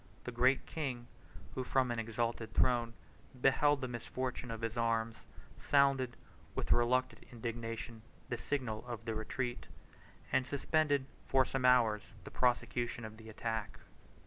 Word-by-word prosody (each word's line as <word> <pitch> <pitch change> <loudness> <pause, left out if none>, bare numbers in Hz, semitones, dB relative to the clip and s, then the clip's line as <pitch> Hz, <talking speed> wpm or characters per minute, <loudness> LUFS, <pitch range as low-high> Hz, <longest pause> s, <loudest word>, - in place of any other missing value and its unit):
The 125 - -4
Great 125 +3 +3
King, 130 -7 -3 0.5
who, 130 - -2
from 130 -1 +2
an 120 - -1
exalted 115 0 -2
throne, 120 -2 +3 0.4
beheld 145 +2 +4
the 130 - -1
misfortunes 125 0 -4
of 115 -1 -5
his 115 0 -2
arms, 115 -1 +1 0.4
sounded, 140 -3 +3 0.4
with - - -2
reluctant 125 +2 +3
indignation, 115 -1 -5 0.3
the 120 - -1
signal 120 -7 -2
of 115 -2 -5
the 115 - -1
retreat, 120 +3 -3 0.6
and 130 -1 +2
suspended 145 -1 +2 0.2
for 130 -1 +4
some 130 0 -1
hours 115 -4 +5 0.2
the - - -9
prosecution 120 -1 +1
of 110 0 -9
the 110 0 -11
attack. 110 -1 -3
120 Hz, 140 wpm, -35 LUFS, 115-130 Hz, 0.6 s, hours